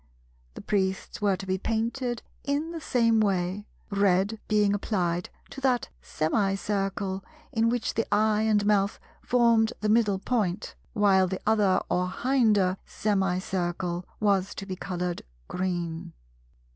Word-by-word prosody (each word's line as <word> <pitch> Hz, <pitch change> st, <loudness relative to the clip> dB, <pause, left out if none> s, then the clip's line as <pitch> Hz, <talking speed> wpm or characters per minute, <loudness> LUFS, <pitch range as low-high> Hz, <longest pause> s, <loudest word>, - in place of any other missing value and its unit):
The -, -, -7 dB
Priests 190 Hz, -1 st, -1 dB
were 200 Hz, -2 st, +3 dB
to 195 Hz, -, -7 dB
be 190 Hz, 0 st, -1 dB
painted 235 Hz, +3 st, -2 dB, 0.2 s
in 290 Hz, +3 st, -1 dB
the 330 Hz, -1 st, -6 dB
same 230 Hz, -5 st, +2 dB
way, 195 Hz, 0 st, 0 dB, 0.2 s
red 200 Hz, +2 st, +2 dB
being 210 Hz, -2 st, +3 dB
applied 180 Hz, -4 st, -1 dB, 0.2 s
to 270 Hz, -, -8 dB
that 255 Hz, -3 st, +1 dB
semicircle 195 Hz, -, -1 dB, 0.3 s
in 225 Hz, 0 st, +2 dB
which 245 Hz, -1 st, -1 dB
the 225 Hz, -, -2 dB
eye 215 Hz, 0 st, +3 dB
and 215 Hz, -2 st, +2 dB
mouth 200 Hz, -1 st, +2 dB, 0.2 s
formed 235 Hz, -2 st, +3 dB
the 215 Hz, -, 0 dB
middle 215 Hz, -3 st, +3 dB
point; 205 Hz, -3 st, -1 dB, 0.2 s
while 195 Hz, -3 st, +4 dB
the 190 Hz, +1 st, -3 dB
other 210 Hz, -4 st, +3 dB
or 180 Hz, 0 st, 0 dB
hinder 210 Hz, -5 st, +2 dB
semicircle 185 Hz, -3 st, -1 dB, 0.2 s
was 200 Hz, -2 st, +1 dB
to 195 Hz, -, -6 dB
be 190 Hz, -1 st, -4 dB
coloured 180 Hz, -1 st, -3 dB, 0.3 s
green. 175 Hz, -3 st, -3 dB
200 Hz, 130 wpm, -27 LUFS, 185-220 Hz, 0.3 s, while